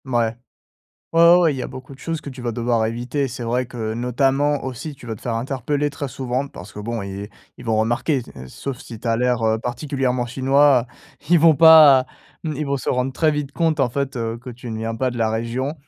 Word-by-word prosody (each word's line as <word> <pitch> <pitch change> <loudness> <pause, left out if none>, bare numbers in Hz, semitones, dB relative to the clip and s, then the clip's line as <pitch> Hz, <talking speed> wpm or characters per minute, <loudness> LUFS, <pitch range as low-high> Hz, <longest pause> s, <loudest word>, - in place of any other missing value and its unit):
Mouais. 120 -3 0 0.8
Ouais, 165 - +3
ouais, 170 +1 +8
ouais, 165 -3 +3
il - - -6
y 130 - -4
a - - -3
beaucoup 130 +1 -10
de - - -17
choses 165 0 -4
que 145 - -9
tu 130 -1 -10
vas 120 -1 -2
devoir 115 -1 0
éviter. 120 +5 -2
C'est 125 +1 -7
vrai 125 +2 -1
que, 115 -3 -4
notamment, 135 +4 +1
aussi, 130 +4 -6
tu 130 - -16
vas 110 -2 -4
te - - -18
faire 120 - -2
interpeller 135 +4 -1
très 145 0 -5
souvent 130 +1 -3
parce 95 -6 -11
que, - - -10
bon, 115 +2 -3
et 100 +1 -6 0.3
ils 125 - -12
vont 110 -2 +1
remarquer 120 +6 +1 0.2
et 65 - -9
sauf 130 - -6
si 115 -3 -10
tu 120 - -4
as 115 - +2
l'air, 125 -1 +1
heu, 110 0 +2
particulièrement 125 0 -2
chinois, 135 +1 +3 0.4
ils 175 - +6
vont 165 0 +6
pas 155 -5 +8 0.4
hem, 155 - -2
ils 150 +2 -3
vont 140 0 0
se 130 - -5
rendre 125 +1 0
très 155 +3 +2
vite 145 -2 -3
compte, 160 -2 +1
en 135 - +3
fait, 140 +1 -3
heu, 115 -1 -2
que 125 +2 -9
tu 120 0 -9
ne 110 - -4
viens 115 +1 -3
pas 130 +3 -1
de 120 - -7
la 115 -1 +2
région. 115 +6 -2
125 Hz, 245 wpm, -21 LUFS, 115-140 Hz, 0.8 s, ouais